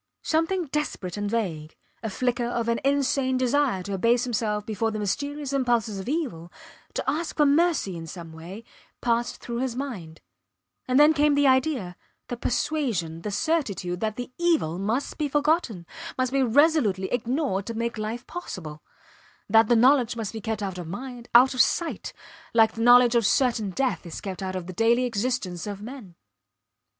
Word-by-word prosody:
Something 330 +3 +1
desperate 270 - -3
and 205 0 -2
vague, 170 -9 -3 0.3
a 225 - -3
flicker 245 +3 -1
of 235 -1 -2
an 235 0 +1
insane 275 -1 +1
desire 255 -6 +1
to 200 - -5
abase 230 +5 +2
himself 210 -3 -1
before 225 +1 -1
the 215 - -4
mysterious 285 +7 -3
impulses 240 -6 +1
of 190 - -5
evil, 215 - -3 0.4
to - - -3
ask 310 +5 -2
for 300 - +5
mercy 295 - +2
in 165 -1 -7
some 165 -1 -9
way, 175 +7 -9 0.4
passed 235 0 0
through 235 -1 -5
his 255 -2 -2
mind; 205 - -6 0.7
and 255 +2 +3
then 300 +2 +7
came 295 -1 +3
the 285 0 +3
idea, 260 - +2 0.3
the 245 - -2
persuasion, 235 - -1
the 210 - -4
certitude, 205 - -1
that 215 -1 -2
the 245 +1 -6
evil 315 - +1
must 225 +11 -2
be 300 - +1
forgotten 290 - 0 0.3
must 255 -1 0
be 275 0 +2
resolutely 250 - +3
ignored 245 -4 -1
to 230 - -4
make 235 +1 -2
life 220 +3 -4
possible; 160 - -7 0.7
that 225 +1 +5
the 240 - +4
knowledge 250 0 +4
must 225 -3 -4
be 220 - -6
kept 220 -1 -3
out 190 -2 -4
of 175 - -6
mind, 245 +5 -7
out 255 +3 +7
of 255 - +4
sight, 330 +4 0 0.4
like 225 -1 +6
the 225 - -6
knowledge 245 0 +7
of 235 -1 +3
certain 230 -2 +2
death 260 +7 -1
is 165 - -6
kept 195 -1 -6
out 185 -1 -3
of 185 -2 -4
the 185 - -7
daily 235 +5 +3
existence 215 -6 -2
of 200 -1 -5
men. 220 -5 -9
235 Hz, 180 wpm, -25 LUFS, 200-270 Hz, 0.7 s, then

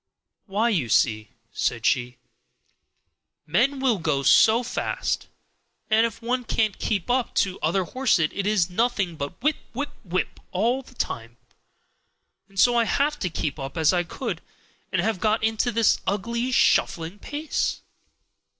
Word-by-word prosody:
"Why, 210 +4 +1
you 160 - 0
see," 110 -1 +2 0.2
said 115 -2 -1
she, 125 -2 +1 1.3
"men 240 - +1
will 255 -6 +2
go 150 -4 0
so 225 - +5
fast, 245 - -2 0.6
and 225 +2 +5
if 230 0 -11
one 250 +2 0
can't 220 -3 0
keep 200 -6 -1
up 250 -1 0
to 190 -1 +1
other 175 +5 +1
horses 195 -7 +1
it 200 0 -2
is 205 -5 +2
nothing 195 -2 0
but 145 +3 -6
whip, 300 0 +2 0.2
whip, 285 +2 -3
whip, 185 -2 -2
all 235 +8 +1
the 255 -1 -18
time. 115 - -4 1.1
And 195 -1 -7
so 240 +5 +5
I 235 -1 +3
have 285 +6 +1
had 295 - -13
to 180 - 0
keep 150 -3 -3
up 135 +3 -6
as 160 +2 +4
I 175 - +2
could, 175 - -5 0.5
and - - +1
have 220 -4 0
got 215 +2 +1
into 225 +2 +1
this 230 -1 +3
ugly 235 +6 -1
shuffling 170 -5 +2
pace. 295 +7 -2
210 Hz, 155 wpm, -24 LUFS, 165-240 Hz, 1.3 s, so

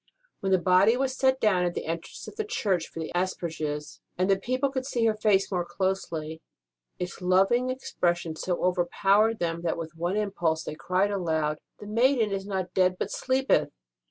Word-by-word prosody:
When 195 - -1
the 190 - +6
body 185 +6 +4
was 260 0 0
set 265 0 +2
down 190 -4 +3
at 175 -1 -1
the - - -3
entrance 165 +1 -5
of - - -9
the 435 - -1
church 205 - -1
for - - -9
the 160 - -4
asperges, 160 -5 -3 0.2
and 190 +1 +2
people 260 +2 0
could 260 -1 -2
see 240 -4 0
her 220 - +4
face 210 -2 +2
more 180 -2 0
closely, 170 -4 -3 0.6
its 180 +1 -5
loving 195 +8 +3
expression 175 -10 -1
so 175 +2 -2
overpowered 195 +5 +3
them 170 -3 -2
that 170 -1 -1
with 165 -1 -6
one 175 +4 -1
impulse 175 -6 0
they - - -5
cried 185 +5 0
aloud: 160 -5 0 0.2
This 205 - -9
maiden 230 0 +2
is 195 0 -3
not 190 -2 -3
dead, 185 -1 +3
but - - -3
sleepeth 265 +1 +1
185 Hz, 185 wpm, -27 LUFS, 170-215 Hz, 0.6 s, the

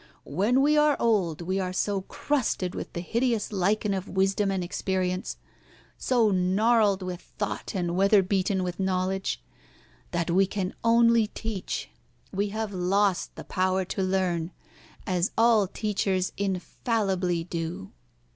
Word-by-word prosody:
When 210 - +2
we 300 +1 +4
are 300 -1 +4
old 185 -9 +1
we 185 +3 -1
are 185 -1 -2
so 195 +1 0
crusted 205 -5 -1
with - - -6
the 170 - -3
hideous 230 +2 0
lichen 200 +2 +1
of 190 0 -4
wisdom 195 +1 +1
and 190 -2 -1
experience, 185 0 -2 0.6
so 235 -5 +2
gnarled 200 +2 +3
with 180 -1 -5 0.2
thought, 205 -1 -3
and 175 -2 -1
weather 195 +1 +5
beaten 190 0 0
with 180 0 -4
knowledge, 190 0 -1 0.7
that 170 -1 -1
we 190 +2 +4
can 195 -1 -3
only 230 -1 +5
teach. 220 -3 -5 0.4
We 200 +2 0
have 215 0 -3
lost 190 +1 +1
the - - -8
power 185 0 0
to 190 - -3
learn, 185 -3 0 0.6
as 180 0 +1
all 225 -3 +5
teachers 195 -2 -1
infallibly 190 -2 -1
do." 165 - -5
190 Hz, 135 wpm, -27 LUFS, 185-210 Hz, 0.7 s, weather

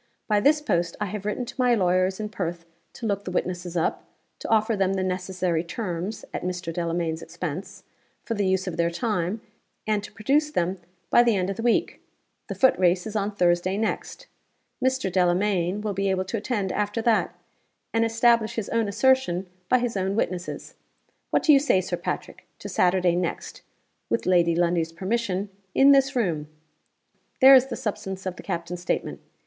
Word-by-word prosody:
By 210 -2 +3
this 295 +7 +3
post 170 - 0
I 210 - 0
have 205 +1 -5
written 245 +4 -2
to - - -8
my 250 -1 +4
lawyers 185 -1 +1
in 210 -1 -3
Perth 175 -4 -4 0.3
to 235 - -7
look 200 -2 -1
the - - -5
witnesses 180 -1 -3
up; 165 - 0 0.4
to - - -6
offer 220 0 +3
them 195 -1 +1
the 190 -1 -1
necessary 185 -2 -1
terms 180 +1 -4
(at - - -3
Mr. 180 -2 -4
Delamayn's 165 -1 -2
expense) - - -6 0.4
for 230 - -3
the 205 -3 0
use 190 0 +1
of 180 -3 -4
their 170 0 +2
time; 200 +1 -2 0.4
and 210 -1 0
to - - -9
produce 275 +9 +1
them 185 - -1 0.3
by - - +7
the 235 -3 +3
end 185 0 0
of - - -4
the - - -3
week. 235 0 +1 0.5
The - - -5
footrace 185 -8 +3
is 220 -1 -6
on 205 0 -1
Thursday 180 +1 +2
next. 220 +1 -3 0.6
Mr. 260 -6 +1
Delamayn 180 +1 +1
will 210 -1 -2
be 195 +1 0
able 190 0 0
to 225 - -3
attend 205 -3 -2
after 210 +2 -1
that, 225 -2 +2 0.6
and 230 0 +3
establish 230 0 +2
his 220 -3 -3
own 230 -2 +1
assertion 220 -4 +2 0.2
by 255 - +5
his 245 -2 -2
own 190 0 -1
witnesses. 185 -4 -3 0.6
What - - +1
do 305 - +6
you 275 - +7
say, 275 -9 +3
Sir 185 - -2
Patrick, - - -5
to - - -8
Saturday 180 -1 +2
next 175 -1 -3 0.5
(with - - 0
Lady 175 -2 +3
Lundie's 170 -1 +1
permission) 195 +1 -2 0.3
in 275 +1 +7
this 275 0 +4
room?' 170 -11 0 0.9
There 270 0 +9
is 260 0 +7
the 245 - -4
substance 190 -3 -5
of 185 -1 -3
the - - -10
captain's 170 +1 -4
statement. 180 - -2
195 Hz, 185 wpm, -25 LUFS, 180-225 Hz, 0.9 s, There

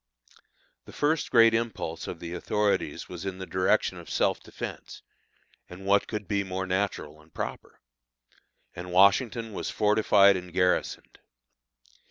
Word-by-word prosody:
The - - -13
first 150 +2 0
great 115 -1 +6
impulse 110 -8 -3
of 85 - -6
the 85 0 -7
authorities 105 +3 -1
was 90 -1 -8
in 95 -1 -4
the 95 - -6
direction 95 0 +1
of - - -12
self - - +1
defence - - -9 0.7
(and 90 +2 -11
what 100 +1 +3
could 105 -2 -5
be 100 -1 0
more 95 0 -4
natural 95 -5 -3
and 80 +1 -23
proper?), - - -7 1.0
and 90 +1 -7
Washington 110 +4 +3
was - - -4
fortified 105 -2 +4
and 90 -1 -6
garrisoned. 90 0 -1
95 Hz, 140 wpm, -27 LUFS, 90-105 Hz, 1.0 s, great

